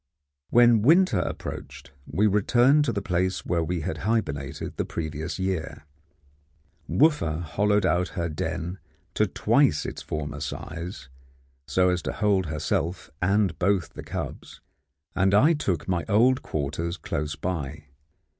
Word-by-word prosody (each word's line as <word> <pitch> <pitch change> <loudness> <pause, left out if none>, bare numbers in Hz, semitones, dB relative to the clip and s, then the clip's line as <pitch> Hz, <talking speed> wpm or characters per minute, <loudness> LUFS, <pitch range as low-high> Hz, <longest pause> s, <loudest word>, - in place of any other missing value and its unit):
When 120 -2 +6
winter 160 - +5
approached, 90 - -6 0.2
we 105 - +1
returned 120 +8 +4
to 125 - +1
the 100 -3 -3
place 90 -2 -1
where 85 -2 0
we 85 +1 -2
had 90 +4 -4
hibernated 75 -11 -2
the - - 0
previous 80 0 -4
year. 95 -5 -3 1.0
Wooffa 110 - +2
hollowed 105 +6 +1
out 90 +1 +2
her 85 -1 0
den 80 +3 -4 0.3
to - - +2
twice - - +2
its - - -5
former 75 -2 -4
size, 80 +3 -6 0.6
so 90 0 +3
as 90 -1 0
to - - -4
hold 100 -4 +1
herself 80 +4 -2
and 100 +2 +1
both 95 -1 +1
the - - -9
cubs, - - -6 0.6
and 95 +2 +3
I 145 +11 +6
took 95 - -2
my 90 -3 0
old 125 +5 +4
quarters 80 +4 -3
close 75 -1 -3
by. 75 -2 -4
90 Hz, 135 wpm, -26 LUFS, 80-105 Hz, 1.0 s, When